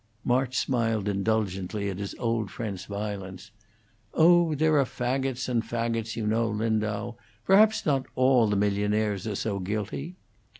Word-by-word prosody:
March 125 Hz, +1 st, +1 dB
smiled 115 Hz, -5 st, 0 dB
indulgently 100 Hz, -1 st, -1 dB
at 95 Hz, -1 st, -4 dB
his 100 Hz, -1 st, -5 dB
old 115 Hz, -3 st, -1 dB
friend's 100 Hz, -4 st, -5 dB
violence. 100 Hz, -1 st, -6 dB, 0.6 s
"Oh, 170 Hz, -1 st, +5 dB
there 155 Hz, 0 st, +3 dB
are -, -, +5 dB
fagots 130 Hz, +1 st, -2 dB
and 120 Hz, -2 st, +1 dB
fagots, 115 Hz, -1 st, -2 dB
you 110 Hz, -, -3 dB
know, 115 Hz, +2 st, +1 dB
Lindau; 110 Hz, +1 st, -1 dB, 0.3 s
perhaps 215 Hz, +3 st, +5 dB
not 135 Hz, -3 st, +1 dB
all 130 Hz, -3 st, +4 dB
the 105 Hz, -, 0 dB
millionaires 105 Hz, 0 st, 0 dB
are 105 Hz, -, -2 dB
so 100 Hz, 0 st, -2 dB
guilty." 110 Hz, -, -4 dB
110 Hz, 140 wpm, -27 LUFS, 105-125 Hz, 0.6 s, Oh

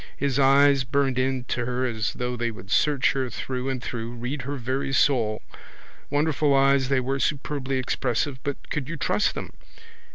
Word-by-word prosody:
His 140 Hz, -1 st, 0 dB
eyes 140 Hz, 0 st, +5 dB
burned 135 Hz, 0 st, 0 dB
into 130 Hz, -1 st, -1 dB
her 125 Hz, +1 st, -1 dB
as 110 Hz, -4 st, -1 dB
though 125 Hz, -1 st, -3 dB
they 120 Hz, 0 st, -1 dB
would 100 Hz, -2 st, -10 dB
search 145 Hz, -3 st, +3 dB
her 135 Hz, -2 st, -2 dB
through 130 Hz, +2 st, -4 dB
and 130 Hz, -3 st, -3 dB
through, 115 Hz, -1 st, -4 dB
read 125 Hz, +4 st, -4 dB
her 140 Hz, +3 st, -4 dB
very 130 Hz, +1 st, -2 dB
soul. 120 Hz, -6 st, +2 dB, 0.7 s
Wonderful 145 Hz, -1 st, +2 dB
eyes 135 Hz, -1 st, +3 dB
they 135 Hz, -1 st, +3 dB
were, 135 Hz, +2 st, -1 dB
superbly 135 Hz, -2 st, -1 dB
expressive, 130 Hz, +1 st, -1 dB
but 140 Hz, -1 st, -5 dB
could 145 Hz, -3 st, -2 dB
you 165 Hz, -, -4 dB
trust 180 Hz, +9 st, +1 dB
them? -, -, -6 dB
130 Hz, 170 wpm, -25 LUFS, 125-140 Hz, 0.7 s, eyes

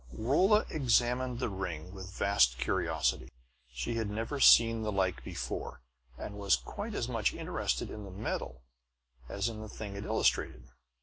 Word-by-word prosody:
Rolla 185 Hz, -, +3 dB
examined 125 Hz, -2 st, +1 dB
the 130 Hz, -, -1 dB
ring 90 Hz, -4 st, -5 dB
with 95 Hz, -1 st, -8 dB
vast 65 Hz, -12 st, +3 dB
curiosity. 65 Hz, -, 0 dB, 0.4 s
She 65 Hz, -, -3 dB
had 110 Hz, -2 st, -1 dB
never 115 Hz, +7 st, -3 dB
seen 115 Hz, -3 st, +7 dB
the 110 Hz, -1 st, -1 dB
like 95 Hz, -2 st, 0 dB
before, -, -, -5 dB, 0.4 s
and 100 Hz, +7 st, -7 dB
was 100 Hz, -1 st, +4 dB
quite -, -, -6 dB
as -, -, -1 dB
much -, -, 0 dB
interested -, -, -2 dB
in 105 Hz, -, -7 dB
the 100 Hz, -, -9 dB
metal 90 Hz, -, -4 dB, 0.7 s
as 100 Hz, +2 st, -1 dB
in 110 Hz, -2 st, -5 dB
the 110 Hz, -, -8 dB
thing 100 Hz, -1 st, -7 dB
it 100 Hz, -, -5 dB
illustrated. 65 Hz, 0 st, 0 dB
105 Hz, 160 wpm, -31 LUFS, 95-115 Hz, 0.7 s, seen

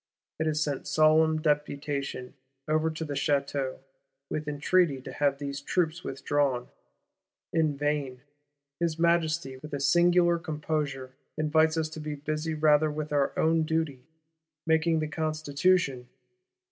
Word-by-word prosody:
It 160 Hz, -, 0 dB
has 155 Hz, -1 st, 0 dB
sent 145 Hz, -3 st, -3 dB
solemn 155 Hz, 0 st, +4 dB
Deputation 145 Hz, -3 st, -2 dB, 0.3 s
over 155 Hz, +1 st, +2 dB
to 160 Hz, 0 st, -5 dB
the 145 Hz, -, -4 dB
Château, 140 Hz, -2 st, -1 dB, 0.5 s
with 155 Hz, 0 st, -3 dB
entreaty 150 Hz, 0 st, +2 dB
to 130 Hz, -, -9 dB
have 140 Hz, -1 st, +1 dB
these 140 Hz, 0 st, -5 dB
troops 170 Hz, +2 st, -1 dB
withdrawn. 135 Hz, -2 st, -1 dB, 0.8 s
In 155 Hz, -3 st, +1 dB
vain: 145 Hz, -3 st, -2 dB, 0.6 s
his 165 Hz, -2 st, 0 dB
Majesty, 165 Hz, -5 st, +1 dB
with 150 Hz, +2 st, -7 dB
a -, -, -3 dB
singular 175 Hz, +4 st, +4 dB
composure, 150 Hz, -5 st, -3 dB, 0.3 s
invites 155 Hz, +1 st, +2 dB
us 160 Hz, -1 st, 0 dB
to 160 Hz, -, -8 dB
be 150 Hz, -1 st, -4 dB
busy 155 Hz, +2 st, -3 dB
rather 155 Hz, 0 st, +4 dB
with 150 Hz, 0 st, -4 dB
our 140 Hz, -1 st, +2 dB
own 160 Hz, 0 st, +3 dB
duty, 160 Hz, -4 st, -1 dB, 0.6 s
making 160 Hz, 0 st, +2 dB
the 155 Hz, -, -1 dB
Constitution! 155 Hz, -2 st, 0 dB
155 Hz, 135 wpm, -28 LUFS, 140-160 Hz, 0.8 s, solemn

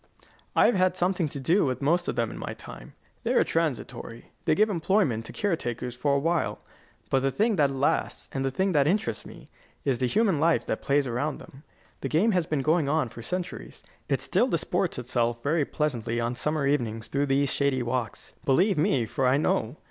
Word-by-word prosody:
I -, -, +6 dB
have -, -, +4 dB
had 185 Hz, -1 st, +2 dB
something 180 Hz, -2 st, +1 dB
to 140 Hz, -, -6 dB
do 170 Hz, +9 st, +3 dB
with 130 Hz, -3 st, -1 dB
most 170 Hz, +5 st, +1 dB
of -, -, -1 dB
them 115 Hz, -2 st, 0 dB
in -, -, -8 dB
my -, -, -5 dB
time. -, -, -11 dB, 0.3 s
They -, -, 0 dB
are -, -, +5 dB
transitory. 135 Hz, -7 st, -3 dB
They -, -, +3 dB
give 215 Hz, +4 st, +4 dB
employment 170 Hz, -, +1 dB
to -, -, -8 dB
care 205 Hz, -5 st, 0 dB
takers 120 Hz, -3 st, -4 dB
for 140 Hz, +3 st, +1 dB
a -, -, +3 dB
while. 165 Hz, +3 st, 0 dB, 0.5 s
But 135 Hz, -, +4 dB
the 135 Hz, +1 st, +1 dB
thing 215 Hz, -, +1 dB
that 145 Hz, -3 st, +4 dB
lasts, 135 Hz, +1 st, -1 dB
and 135 Hz, -, -2 dB
the 135 Hz, -, +1 dB
thing 190 Hz, +9 st, 0 dB
that 145 Hz, -4 st, +3 dB
interests 155 Hz, -, -1 dB
me, -, -, -13 dB, 0.4 s
is 130 Hz, -3 st, +1 dB
the 125 Hz, -, +1 dB
human 200 Hz, -, +2 dB
life 165 Hz, +2 st, +2 dB
that -, -, -2 dB
plays 140 Hz, 0 st, +2 dB
around 130 Hz, +5 st, -2 dB
them. 135 Hz, -, -14 dB, 0.4 s
The -, -, -3 dB
game 195 Hz, +9 st, +3 dB
has 180 Hz, -5 st, +1 dB
been 150 Hz, -3 st, -1 dB
going 155 Hz, -1 st, +2 dB
on 155 Hz, -4 st, +1 dB
for 115 Hz, -, -10 dB
centuries. 180 Hz, +9 st, -5 dB, 0.3 s
It -, -, +1 dB
still -, -, +2 dB
disports -, -, -1 dB
itself 120 Hz, -1 st, -1 dB
very 150 Hz, +1 st, +1 dB
pleasantly 120 Hz, -7 st, -2 dB
on 120 Hz, +1 st, -1 dB
summer 150 Hz, +4 st, -1 dB
evenings 115 Hz, -6 st, -1 dB
through 140 Hz, +1 st, 0 dB
these 135 Hz, 0 st, +1 dB
shady 140 Hz, -3 st, +1 dB
walks. 120 Hz, -2 st, -3 dB
Believe 180 Hz, +6 st, +3 dB
me, 135 Hz, -5 st, +2 dB
for 130 Hz, +4 st, 0 dB
I 130 Hz, +2 st, +4 dB
know. 135 Hz, -2 st, 0 dB
140 Hz, 210 wpm, -27 LUFS, 125-170 Hz, 0.5 s, I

